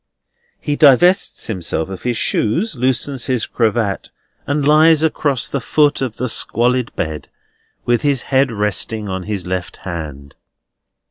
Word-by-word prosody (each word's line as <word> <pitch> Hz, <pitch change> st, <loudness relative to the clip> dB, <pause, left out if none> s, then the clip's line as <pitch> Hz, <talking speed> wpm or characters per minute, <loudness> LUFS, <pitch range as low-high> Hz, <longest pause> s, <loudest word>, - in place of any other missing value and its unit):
He 145 Hz, -, -2 dB
divests 170 Hz, +7 st, +4 dB
himself 85 Hz, -6 st, -3 dB
of 95 Hz, -, -7 dB
his 120 Hz, -2 st, -2 dB
shoes, 165 Hz, -, 0 dB
loosens 130 Hz, +1 st, -1 dB
his 125 Hz, -4 st, 0 dB
cravat, 110 Hz, -3 st, -1 dB, 0.4 s
and 145 Hz, 0 st, 0 dB
lies 155 Hz, +1 st, +5 dB
across 145 Hz, -5 st, 0 dB
the 140 Hz, -, -3 dB
foot 145 Hz, +4 st, +2 dB
of 125 Hz, -5 st, -3 dB
the 125 Hz, -, -2 dB
squalid 120 Hz, +1 st, +1 dB
bed, 80 Hz, -2 st, -4 dB, 0.6 s
with 120 Hz, -1 st, +2 dB
his 140 Hz, -4 st, +1 dB
head 135 Hz, -1 st, +3 dB
resting 105 Hz, 0 st, -1 dB
on 95 Hz, -1 st, -4 dB
his 100 Hz, -4 st, -3 dB
left 90 Hz, 0 st, -4 dB
hand. 75 Hz, -6 st, -7 dB
120 Hz, 140 wpm, -18 LUFS, 100-145 Hz, 0.6 s, lies